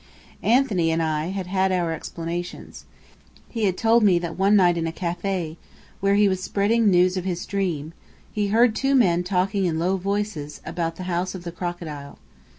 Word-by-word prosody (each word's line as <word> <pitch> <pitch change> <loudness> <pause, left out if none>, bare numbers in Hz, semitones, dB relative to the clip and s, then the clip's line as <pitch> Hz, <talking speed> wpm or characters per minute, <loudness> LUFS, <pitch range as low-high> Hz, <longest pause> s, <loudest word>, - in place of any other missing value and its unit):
Anthony 220 -9 +2
and 160 0 +1
I 155 -1 -1
had 190 0 -4
had 190 +1 +1
our 175 -3 0
explanations. 170 +2 -6 0.6
He 225 -3 -1
had 185 -2 0
told 230 +1 +4
me 195 -5 +5
that 170 -1 -4
one 195 +2 +3
night 180 -3 +5
in 165 -1 -1
a - - -2
café, 175 -1 -3 0.4
where 200 0 +2
he 205 0 +5
was 190 -1 -1
spreading 210 +5 +1
the 205 - +5
news 180 +1 +3
of 185 - -2
his 180 -2 -3
dream, 170 -6 -2 0.4
he 210 -1 -1
had 200 - -3
heard 235 -1 +4
two 275 +3 +1
men 180 -9 +3
talking 190 +2 0
in 165 -3 0
low 180 +4 +1
voices 195 -6 -3
about 165 -1 -3
the 185 - -7
House 180 +1 -2
of 180 - -8
the 170 - -5
Crocodile. 170 -5 -6
185 Hz, 195 wpm, -23 LUFS, 170-200 Hz, 0.6 s, me